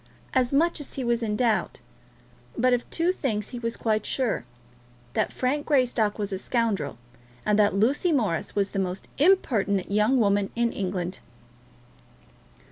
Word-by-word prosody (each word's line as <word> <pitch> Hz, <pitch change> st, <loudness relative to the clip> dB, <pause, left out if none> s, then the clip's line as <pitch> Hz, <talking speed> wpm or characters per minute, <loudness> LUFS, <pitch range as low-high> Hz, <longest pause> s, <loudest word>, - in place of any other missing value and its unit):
As 255 Hz, -2 st, +3 dB
to 275 Hz, -, -1 dB
much 335 Hz, +2 st, +2 dB
he 265 Hz, -, -3 dB
was 235 Hz, 0 st, +1 dB
in 215 Hz, -2 st, -1 dB
doubt; 230 Hz, -1 st, 0 dB, 0.8 s
but 250 Hz, +1 st, +3 dB
of 245 Hz, -, -1 dB
two 340 Hz, +2 st, +1 dB
things 220 Hz, -, -2 dB
he 245 Hz, -, -6 dB
was 230 Hz, -1 st, -3 dB
quite 215 Hz, -2 st, 0 dB
sure, 250 Hz, -, -1 dB, 0.7 s
that -, -, 0 dB
Frank 285 Hz, +3 st, -1 dB
Greystock 245 Hz, -7 st, +2 dB
was 205 Hz, -2 st, -3 dB
a 190 Hz, -, -2 dB
scoundrel, 215 Hz, -, -1 dB, 0.5 s
and 210 Hz, 0 st, +2 dB
that 205 Hz, -2 st, +4 dB
Lucy 265 Hz, -, +2 dB
Morris 215 Hz, -, 0 dB
was 200 Hz, -1 st, +1 dB
the 195 Hz, -, -2 dB
most 185 Hz, 0 st, -3 dB
impertinent 220 Hz, -, +2 dB
young 210 Hz, +6 st, +3 dB
woman 200 Hz, -2 st, +2 dB
in 235 Hz, 0 st, +1 dB
England. 185 Hz, -1 st, -3 dB
225 Hz, 155 wpm, -26 LUFS, 200-255 Hz, 0.8 s, that